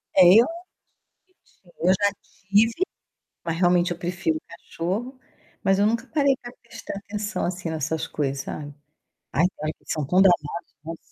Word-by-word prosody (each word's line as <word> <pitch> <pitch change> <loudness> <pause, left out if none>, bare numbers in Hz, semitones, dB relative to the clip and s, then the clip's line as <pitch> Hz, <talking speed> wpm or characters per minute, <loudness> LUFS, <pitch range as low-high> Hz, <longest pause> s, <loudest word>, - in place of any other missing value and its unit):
É, 190 - +7
eu 225 - +9
acho 335 +6 -6 1.0
bonitinho. 175 -1 -1
Eu - - +6
já 200 +1 +2 0.4
tive, 225 - +4 0.6
mas 165 -1 -2
realmente 175 0 +3
eu 175 - -2
prefiro 175 -3 -1
cachorro, 190 +9 -4 0.4
mas 195 0 +3
eu 205 - +4
nunca 230 +3 0
parei 280 -2 +3
pra 240 - -8
prestar 235 - -8
atenção 205 -1 -3
assim 175 -1 -3
nessas 160 0 -2
coisas, 140 -2 -2
sabe. 145 -1 -6 0.6
Ai, 155 +7 +3 0.2
eles 155 - -1 0.2
são 150 -3 -2
tão 180 +6 +4
dramáticos, 170 -5 +1
nossa! 165 +1 -6
180 Hz, 155 wpm, -24 LUFS, 165-210 Hz, 1.0 s, eu